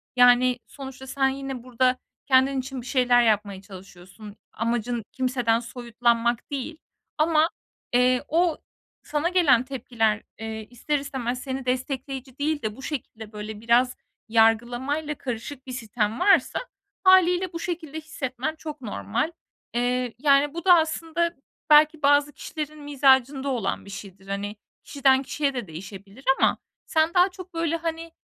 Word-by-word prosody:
Yani, 245 Hz, 0 st, +5 dB
sonuçta 265 Hz, -1 st, -9 dB
sen 270 Hz, 0 st, +1 dB
yine 270 Hz, -2 st, -5 dB
burada 255 Hz, +1 st, +1 dB, 0.3 s
kendin 265 Hz, 0 st, +3 dB
için 260 Hz, 0 st, -5 dB
bir -, -, -13 dB
şeyler 245 Hz, -2 st, +4 dB
yapmaya 205 Hz, -3 st, +1 dB
çalışıyorsun. 195 Hz, +1 st, -12 dB, 0.2 s
Amacın 235 Hz, +1 st, -1 dB
kimseden 250 Hz, -3 st, +1 dB
soyutlanmak 235 Hz, +1 st, -1 dB
değil. 285 Hz, +3 st, -4 dB, 0.4 s
Ama, 315 Hz, +1 st, +3 dB, 0.4 s
eee, 250 Hz, +1 st, +3 dB
o 335 Hz, 0 st, +2 dB, 0.5 s
sana 305 Hz, +3 st, -1 dB
gelen 305 Hz, -10 st, +4 dB
tepkiler, 230 Hz, -5 st, -1 dB, 0.2 s
eee, 220 Hz, -1 st, -6 dB
ister 280 Hz, +5 st, -1 dB
istemez 255 Hz, -3 st, -4 dB
seni 265 Hz, -1 st, -4 dB
destekleyici 260 Hz, 0 st, -3 dB
değil 300 Hz, +1 st, 0 dB
de 215 Hz, -1 st, -3 dB
bu 265 Hz, -, -12 dB
şekilde, 225 Hz, -7 st, -6 dB
böyle, 210 Hz, 0 st, -7 dB
biraz 240 Hz, +2 st, +3 dB, 0.3 s
yargılamayla 240 Hz, +7 st, +2 dB
karışık 260 Hz, +1 st, -6 dB
bir -, -, -6 dB
sitem 225 Hz, -2 st, -2 dB
varsa 400 Hz, -, +4 dB, 0.4 s
hâliyle 370 Hz, -1 st, +5 dB
bu 335 Hz, -, -4 dB
şekilde 330 Hz, -3 st, -5 dB
hissetmen 300 Hz, -2 st, -4 dB
çok 305 Hz, -2 st, -8 dB
normal. 155 Hz, -, -2 dB, 0.4 s
Eee, 245 Hz, 0 st, 0 dB
yani, 280 Hz, +1 st, +4 dB
bu 340 Hz, +2 st, -6 dB
da 365 Hz, -, +8 dB
aslında 330 Hz, +1 st, 0 dB, 0.3 s
belki 305 Hz, +1 st, +6 dB
bazı 285 Hz, +1 st, +4 dB
kişilerin 305 Hz, -1 st, -6 dB
mizacında 275 Hz, -1 st, +3 dB
olan 235 Hz, -7 st, -2 dB
bir -, -, -11 dB
şeydir. 195 Hz, -1 st, -10 dB
Hani, 200 Hz, +1 st, -4 dB, 0.3 s
kişiden 270 Hz, -2 st, +3 dB
kişiye 280 Hz, +1 st, -1 dB
de 245 Hz, -6 st, -4 dB
değişebilir 195 Hz, +7 st, -10 dB, 0.2 s
ama -, -, +3 dB, 0.3 s
sen 315 Hz, +1 st, +1 dB
daha 360 Hz, +1 st, +5 dB
çok, 370 Hz, -1 st, -12 dB
böyle, 330 Hz, 0 st, 0 dB
hani, 330 Hz, 0 st, -4 dB
260 Hz, 140 wpm, -25 LUFS, 230-300 Hz, 0.5 s, da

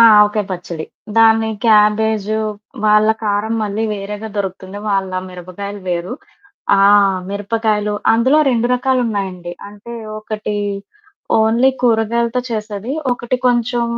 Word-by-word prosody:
ఆ! -, -, +9 dB, 0.2 s
ఆవకాయ 210 Hz, 0 st, +3 dB
పచ్చడి. 175 Hz, -3 st, -5 dB, 0.3 s
దాన్ని 225 Hz, 0 st, +5 dB, 0.2 s
క్యాబేజు 215 Hz, -1 st, +3 dB, 0.5 s
వాళ్ళ 210 Hz, 0 st, +4 dB, 0.2 s
కారం 210 Hz, +2 st, 0 dB
మళ్ళీ 210 Hz, +1 st, -2 dB
వేరేగా 205 Hz, +2 st, -6 dB
దొరుకుతుంది. 190 Hz, 0 st, -4 dB
వాళ్ళ 195 Hz, -1 st, 0 dB, 0.2 s
మిరపకాయలు 185 Hz, +3 st, -8 dB
వేరు. 175 Hz, +4 st, -2 dB, 0.7 s
ఆ! -, -, +5 dB, 0.5 s
మిరపకాయలు. 210 Hz, +1 st, -1 dB, 0.2 s
అందులో 260 Hz, +6 st, +3 dB
2 240 Hz, -1 st, +1 dB
రకాలున్నాయండి. 205 Hz, -9 st, -1 dB, 0.2 s
అంటే 210 Hz, +3 st, -10 dB, 0.2 s
ఒకటి 215 Hz, -1 st, -4 dB, 0.8 s
ఓన్లీ 230 Hz, +4 st, +4 dB
కూరగాయలతో 235 Hz, +1 st, +1 dB
చేసేది. 215 Hz, +1 st, -4 dB, 0.2 s
ఒకటి 245 Hz, +1 st, -2 dB
కొంచెం 240 Hz, 0 st, +1 dB
215 Hz, 105 wpm, -17 LUFS, 200-230 Hz, 0.8 s, ఆ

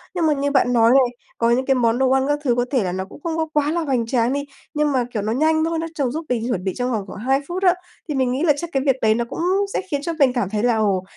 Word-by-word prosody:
Nhưng 340 Hz, -3 st, +1 dB
mà 305 Hz, -, +3 dB
như 285 Hz, 0 st, -1 dB
bạn 260 Hz, -3 st, +2 dB
nói 230 Hz, -1 st, +5 dB
này, 250 Hz, -2 st, +3 dB, 0.2 s
có 230 Hz, -, +2 dB
những 250 Hz, +2 st, +2 dB
cái 270 Hz, -, +2 dB
món 235 Hz, -2 st, +2 dB
đồ 265 Hz, 0 st, +2 dB
ăn 265 Hz, 0 st, +2 dB
các 290 Hz, 0 st, 0 dB
thứ 245 Hz, -4 st, +2 dB
có 245 Hz, 0 st, +1 dB
thể 260 Hz, -6 st, +2 dB
là 180 Hz, -, -2 dB
nó 190 Hz, +1 st, -3 dB
cũng 200 Hz, -, -14 dB
không 330 Hz, -1 st, -2 dB
có 320 Hz, -1 st, 0 dB
quá 295 Hz, 0 st, +1 dB
là 340 Hz, +1 st, 0 dB
hoành 260 Hz, -7 st, 0 dB
tráng 235 Hz, +1 st, +1 dB
đi, 285 Hz, 0 st, -2 dB, 0.3 s
nhưng 300 Hz, -1 st, +1 dB
mà 260 Hz, -3 st, +1 dB
kiểu 215 Hz, -, -1 dB
nó 215 Hz, +2 st, -2 dB
nhanh 315 Hz, +4 st, +2 dB
thôi, 330 Hz, 0 st, -1 dB
nó 330 Hz, -, -3 dB
trong 275 Hz, -6 st, 0 dB
giúp 320 Hz, +4 st, -5 dB
mình 235 Hz, -2 st, -1 dB
chuẩn 190 Hz, -7 st, -2 dB
bị 190 Hz, -1 st, -2 dB
trong 250 Hz, 0 st, -1 dB
vòng 215 Hz, -4 st, -1 dB
khoảng 190 Hz, -, -9 dB
2 265 Hz, +5 st, +1 dB
phút 365 Hz, +2 st, -4 dB
á. 360 Hz, -2 st, +6 dB, 0.4 s
Thì 295 Hz, -, -1 dB
mình 260 Hz, -2 st, +1 dB
nghĩ 265 Hz, +5 st, -1 dB
là 310 Hz, -4 st, +5 dB
chắc 340 Hz, +3 st, -5 dB
cái 270 Hz, -, +1 dB
việc 270 Hz, -3 st, +3 dB
đấy 220 Hz, -1 st, +4 dB
nó 235 Hz, +1 st, -1 dB
cũng -, -, -6 dB, 0.3 s
sẽ -, -, 0 dB
khiến 285 Hz, -1 st, -1 dB
cho 335 Hz, -, -2 dB
mình 265 Hz, -3 st, +4 dB
cảm 240 Hz, -7 st, -1 dB
thấy 210 Hz, +1 st, -2 dB
là, 240 Hz, -2 st, +2 dB
ồ, 200 Hz, -4 st, +1 dB
260 Hz, 335 wpm, -21 LUFS, 235-295 Hz, 0.4 s, á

